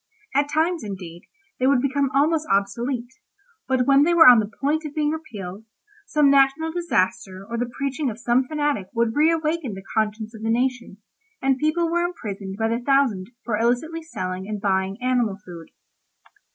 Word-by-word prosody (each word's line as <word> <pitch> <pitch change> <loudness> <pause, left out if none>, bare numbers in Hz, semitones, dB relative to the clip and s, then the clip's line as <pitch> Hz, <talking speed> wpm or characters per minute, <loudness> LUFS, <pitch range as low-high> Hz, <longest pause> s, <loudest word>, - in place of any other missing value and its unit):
At 285 +1 +2
times, 320 +3 0
indeed, 185 -4 -8 0.3
they 255 - +2
would 275 -2 +4
become 275 +1 0
almost 310 +2 +2
obsolete, 235 +6 -1 0.5
but 260 -1 +1
when 275 +1 +5
they 340 +4 +3
were 325 -4 +8
on 245 -2 +9
the 210 -1 -2
point 300 +4 0
of 300 -2 -7
being 300 -1 +1
repealed, 215 - -7 0.4
some 295 -2 +3
national 275 +4 +3
disaster 220 - -1
or 235 - -5
the 240 +1 -2
preaching 275 +1 -1
of 220 - -6
some 240 +2 +1
fanatic 290 -10 -1
would 230 -1 +1
reawaken 315 -5 +1
the 190 0 -10
conscience 220 +1 -1
of 220 - -11
the 225 - -2
nation, 245 -3 -1 0.4
and 270 -1 +1
people 310 +3 +1
were 345 +1 0
imprisoned 200 - -5
by 225 0 0
the 230 +1 -1
thousand 245 -8 +1 0.2
for 220 -3 -2
illicitly 250 +8 0
selling 185 - -5
and 210 -1 -4
buying 195 0 -1
animal 245 -6 +1
food. 170 -2 -10
250 Hz, 175 wpm, -23 LUFS, 210-295 Hz, 0.5 s, on